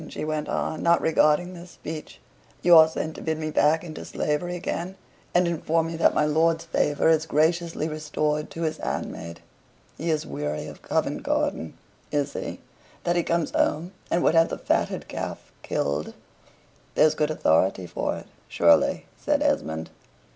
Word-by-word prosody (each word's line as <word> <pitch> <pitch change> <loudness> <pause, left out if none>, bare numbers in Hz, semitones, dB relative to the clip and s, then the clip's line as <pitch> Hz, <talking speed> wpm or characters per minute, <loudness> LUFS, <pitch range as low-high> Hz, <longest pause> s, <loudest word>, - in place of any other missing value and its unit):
she - - -5
went 155 -1 -2
on, 160 - -2
not 170 0 +4
regarding 160 +3 +3
this 175 0 -10
speech. 160 -2 -8 0.4
"You 175 -1 +7
are 160 -1 +9
sent 160 0 -4
to - - -9
bid 160 -1 -1
me 155 0 -3
back 155 +3 +3
into 155 -3 -7
slavery 175 +4 -2
again, 175 +1 -4 0.4
and 175 0 +3
inform 165 -1 0
me 165 0 -4
that 165 - +3
my 150 - +3
lord's 160 +2 +2
favor 145 +1 +1
is 160 0 +3
graciously 165 +1 +1
restored 150 -1 -2
to 165 - -5
his 160 -1 -1
handmaid? 85 +1 -5 0.6
He 165 - -2
is 155 0 0
weary 75 - -3
of - - -10
Covent - - -1
Garden, 80 - -1 0.3
is 145 -1 0
he, - - -5 0.4
that 175 - +1
he 175 - +3
comes 170 -1 0
home 165 +4 0 0.2
and 170 - +1
would - - +4
have 165 0 +5
the - - -4
fatted - - -1
calf - - -6
killed?" 70 +2 -2 0.8
"There's 155 - +5
good 150 0 0
authority 95 - +2
for - - -2
it, - - -9 0.2
surely," - - +3 0.2
said - - +2
Esmond. 80 +1 -1
155 Hz, 170 wpm, -25 LUFS, 150-165 Hz, 0.8 s, are